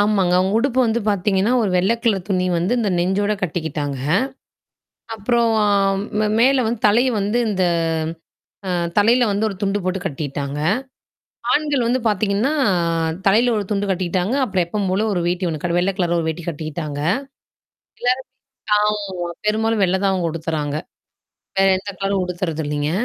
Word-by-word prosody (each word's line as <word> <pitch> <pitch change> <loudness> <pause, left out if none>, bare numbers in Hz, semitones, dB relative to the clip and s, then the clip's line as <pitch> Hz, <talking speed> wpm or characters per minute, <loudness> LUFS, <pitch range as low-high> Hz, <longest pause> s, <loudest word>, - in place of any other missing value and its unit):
ஆமாங்க, 200 -4 +2
அவுங்க 190 +2 +1
உடுப்பு 260 +1 0
வந்து 230 +1 0
பார்த்தீங்கன்னா, 200 +2 +1
ஒரு 205 - 0
வெள்ளை 190 +6 +3
கலர் 195 -6 +1
துணி 185 -2 +1
வந்து 175 +6 0
அந்த 215 -4 0
நெஞ்சோட 190 +4 +1
கட்டிக்கிட்டாங்க. 150 -5 -3 1.2
அப்புறம் 230 +2 +1 0.7
மே 215 - +2
மேல 260 +2 +4
வந்து 235 0 -2
தலை 225 +4 +4 0.2
வந்து 205 +4 0
இந்த 190 -3 0 1.0
அ - - -2 0.3
தலையில 235 +4 +4
வந்து 205 +2 0
ஒரு 205 - -4
துண்டு 200 0 0
போட்டு 185 +1 -1
கட்டிட்டாங்க. 145 -3 -4 1.0
ஆண்கள் 295 -3 +1
வந்து 250 +2 +1
பார்த்தீங்கன்னா, 210 +5 +1 0.7
தலையில 225 +5 +4
ஒரு 205 - -1
துண்டு 205 -1 0
கட்டிக்கிட்டாங்க, 185 +3 0
அப்புறம் 190 -6 0
எப்பவும் 200 +2 -2
போல 195 +4 +1
ஒரு 180 - 0
வேட்டி 180 +1 0
ஒண்ணு 170 +2 -2
வெள்ள 185 +2 +1
கலர்ல 175 -2 +1
ஒரு 160 - -3
வேட்டி 160 +2 -3
கட்டிக்கிட்டாங்க. 155 -2 -4 1.0
எல்லாருமே 255 +1 0 0.5
ஆமா, 200 -4 -1 0.2
பெரும்பாலும் 220 0 +1
வெள்ளை 190 0 +2
தான் 195 - +3
அவுங்க 180 -3 0
உடுத்துறாங்க. 155 -3 -3 0.8
வேற 195 - +5
எந்த 200 +1 -6
கலரும் 195 -1 0
உடுத்துறது 175 -3 -3
இல்லேங்க. 145 0 -1
195 Hz, 150 wpm, -20 LUFS, 175-215 Hz, 1.2 s, வேற